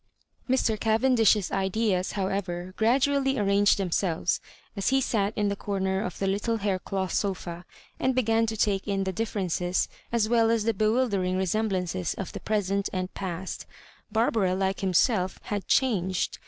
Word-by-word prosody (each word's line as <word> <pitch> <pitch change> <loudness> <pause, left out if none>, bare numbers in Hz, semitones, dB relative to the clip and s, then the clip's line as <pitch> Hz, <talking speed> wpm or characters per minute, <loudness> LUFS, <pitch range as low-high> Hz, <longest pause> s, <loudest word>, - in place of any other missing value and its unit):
Mr. 230 -4 +1
Cavendish's 225 -3 +3
ideas, 195 -1 0
however, 190 -2 -3
gradually 270 +4 +2
arranged 200 -1 +3
themselves 180 -2 0 0.3
as 200 - -2
he 270 - +3
sat 210 -6 0
in 210 -1 +1
the 200 - 0
comer 190 -1 -1
of 180 -4 -4
the 195 - -2
little 205 +4 0
haircloth 190 -2 -2
sofa, 180 -3 -2 0.3
and 260 0 +1
began 225 -2 +2
to 220 0 -3
take 200 -1 0
in 195 -1 0
the 190 0 -2
differences 185 -4 -1 0.2
as 230 -2 +2
well 230 -1 +3
as 230 -2 +2
the 230 +1 +1
bewUdering 215 -3 +1
resem 200 +4 0
bUmoes 180 -2 -2
of 195 - -5
the - - -5
present 200 -2 -1
and 185 -1 -3
past 185 -1 -5 0.4
Barbara, 220 -4 +2
like 190 0 -1
himself 190 +1 +2
had 205 -2 -4
changed. 190 -9 +1
200 Hz, 155 wpm, -27 LUFS, 185-225 Hz, 0.4 s, Cavendish's